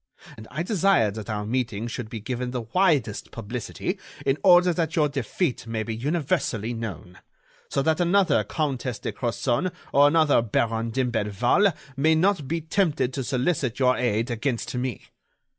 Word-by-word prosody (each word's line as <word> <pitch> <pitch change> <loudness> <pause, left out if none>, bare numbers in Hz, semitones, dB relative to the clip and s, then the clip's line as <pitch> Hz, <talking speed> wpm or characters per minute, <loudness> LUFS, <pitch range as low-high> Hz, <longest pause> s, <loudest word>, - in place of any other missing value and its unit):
And 110 - -11
I 155 +6 -3
desired 185 - +2
that 110 -1 -7
our 105 -1 -2
meeting 115 -2 -2
should 120 -1 -5
be 115 - -5
given 125 +3 -3
the 125 -1 -3
widest 140 - +1
publicity 115 +1 -5 0.3
in 135 +2 +1
order 180 -2 +6
that 165 -2 -1
your 155 -3 +3
defeat 140 - -2
may 115 -1 -2
be 115 0 -4
universally 125 -5 -1
known, 95 -6 -7 0.5
so 140 - 0
that 160 +3 +1
another 180 +2 +3
Countess 135 -6 -2
de - - -4
Crozon 120 +7 -1 0.2
or 140 +1 +7
another 155 -3 +4
Baron 115 0 0
d'Imblevalle 120 - +2 0.2
may 155 +4 +3
not 175 -3 +2
be 165 +3 -1
tempted 155 -6 0
to 135 - -2
solicit 130 -1 0
your 125 -1 +3
aid 115 0 0
against 120 +1 -2
me. 125 -2 -3
130 Hz, 160 wpm, -25 LUFS, 115-160 Hz, 0.5 s, or